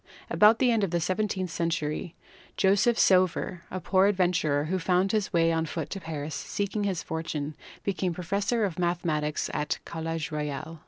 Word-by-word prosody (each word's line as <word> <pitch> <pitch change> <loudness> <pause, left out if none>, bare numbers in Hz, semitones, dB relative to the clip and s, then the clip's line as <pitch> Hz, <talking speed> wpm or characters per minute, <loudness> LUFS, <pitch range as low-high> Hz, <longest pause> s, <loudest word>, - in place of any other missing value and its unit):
About 215 +2 +6
the 250 -1 +3
end 225 -3 +2
of 195 - +1
the 170 +1 0
seventeenth 185 0 -1
century 165 0 -2 0.4
Joseph 205 +5 +3
Sauveur, 185 -1 +3
a 185 - -4
poor 190 +1 +3
adventurer 175 -7 +2
who 185 +5 -1
found 180 +2 +2
his 215 -2 0
way 165 -2 +3
on 165 0 0
foot 160 -1 -4
to 195 - -3
Paris 155 -2 -5
seeking 200 +8 -2
his 190 -4 -1
fortune, 155 -2 -4 0.3
became 190 -2 -1
professor 200 +6 0
of 180 -3 -4
mathematics 165 -4 0
at 150 0 -2
the - - -1
College 165 -1 -4
Royal. 150 +1 -4
175 Hz, 170 wpm, -27 LUFS, 160-195 Hz, 0.4 s, About